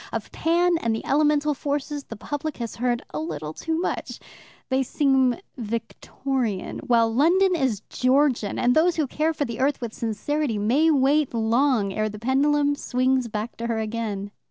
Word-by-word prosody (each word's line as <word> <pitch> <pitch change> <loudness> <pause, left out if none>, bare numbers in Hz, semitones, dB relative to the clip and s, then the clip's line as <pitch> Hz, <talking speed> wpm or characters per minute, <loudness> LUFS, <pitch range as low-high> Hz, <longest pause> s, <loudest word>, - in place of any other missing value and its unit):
Of - - -4
Pan 340 +1 +2
and 230 -5 0
the - - -6
elemental 300 0 +2
forces, 290 0 -3
the 225 - -8
public 290 +6 -5
has 235 -2 -5
heard 240 0 0
a 150 - -2
little 155 -1 -5
too 320 - -2
much 360 - -3 0.5
they 260 0 +2
seem 265 -1 +2 0.2
Victorian, 230 0 -3
while 230 -2 +2
London 355 +8 +4
is 260 - 0
Georgian 255 -4 +1
and 245 0 +3
those 330 +2 +4
who 310 - +1
care 305 +4 0
for 295 -2 -2
the 235 -3 -6
earth 275 +2 +1
with 235 -3 -5
sincerity 235 +3 -2
may 255 +10 +3
wait 285 -2 +2
long 225 -2 +2
ere 215 +1 -1
the 210 - -8
pendulum 285 +5 +2
swings 255 -2 0
back 215 +1 -4
to 235 - -3
her 230 -1 -1
again. 215 -2 -3
260 Hz, 170 wpm, -24 LUFS, 225-295 Hz, 0.5 s, London